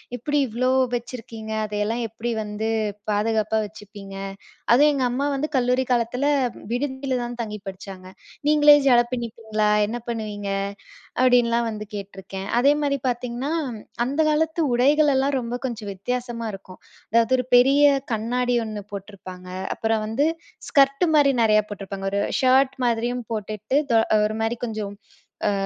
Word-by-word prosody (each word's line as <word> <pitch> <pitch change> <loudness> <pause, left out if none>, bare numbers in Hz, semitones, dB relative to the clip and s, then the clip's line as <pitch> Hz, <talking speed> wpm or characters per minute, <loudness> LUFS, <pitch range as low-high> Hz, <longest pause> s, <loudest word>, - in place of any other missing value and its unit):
எப்டி 290 +5 -1
இவ்ளோ 250 +3 0 0.2
வச்சுருக்கீங்க? 230 -2 -6
அதையெல்லாம் 210 +3 -2
எப்டி 225 +2 -5
வந்து 210 +1 -4 0.4
பாதுகாப்பா 215 +1 +1
வச்சுப்பீங்க? 200 -1 -11 0.6
அதுவும் 295 +4 +6
எங்க 265 -2 0
அம்மா 265 +3 -1
வந்து 290 +3 -1
கல்லூரி 250 +1 +2
காலத்தில, 245 +3 +1 0.5
விடுதியில 265 0 -2
தான் 240 0 -5
தங்கி 210 -2 -5
படிச்சாங்க. 190 -1 -8 0.4
"நீங்களே 295 -1 +7
ஜட 245 -2 +6
பின்னப்பீங்களா? 220 -3 -2 0.2
என்ன 235 - -3
பண்ணுவீங்க?"அப்டின்லாம் 220 +3 -1
வந்து 210 -1 -6
கேட்டுருக்கேன். 195 -1 -7
அதேமாரி 285 +1 +2
பாத்தீங்கன்னா, 245 +4 -3 0.2
ம் 210 - -10 0.2
அந்த 280 +5 -3
காலத்து 320 +2 +1
உடைகளெல்லாம் 275 +1 +3
ரொம்ப 235 -2 -5 0.2
கொஞ்சம் 220 -5 -4
வித்தியாசமா 240 +3 -4
இருக்கும். 190 -1 -11 0.3
அதாவது 230 +3 +4
ஒரு 250 - -2
பெரிய 275 +4 +5 0.3
கண்ணாடி 245 +3 0
ஒண்ணு 210 -2 -6
போட்ருப்பாங்க. 185 -2 -9 0.3
அப்புறம் 220 -1 0
வந்து, 270 +8 +1 0.4
ஸ்கர்ட்டு 275 +4 +4
மாரி 280 -2 +5
நெறையா 215 -1 +4
போட்ருப்பாங்க. 195 -1 -5
ஒரு 200 - +1 0.2
ஷர்ட் 265 +1 +4
மாதிரியும் 240 +1 -1
போட்டுக்ட்டு, 215 +5 -2
தொ 230 - +5 0.3
ஒரு 215 +1 -5
மாரி 230 +2 -1
கொஞ்சம் 210 -3 -5 0.5
அ 205 - +3
235 Hz, 130 wpm, -23 LUFS, 210-260 Hz, 0.6 s, நீங்களே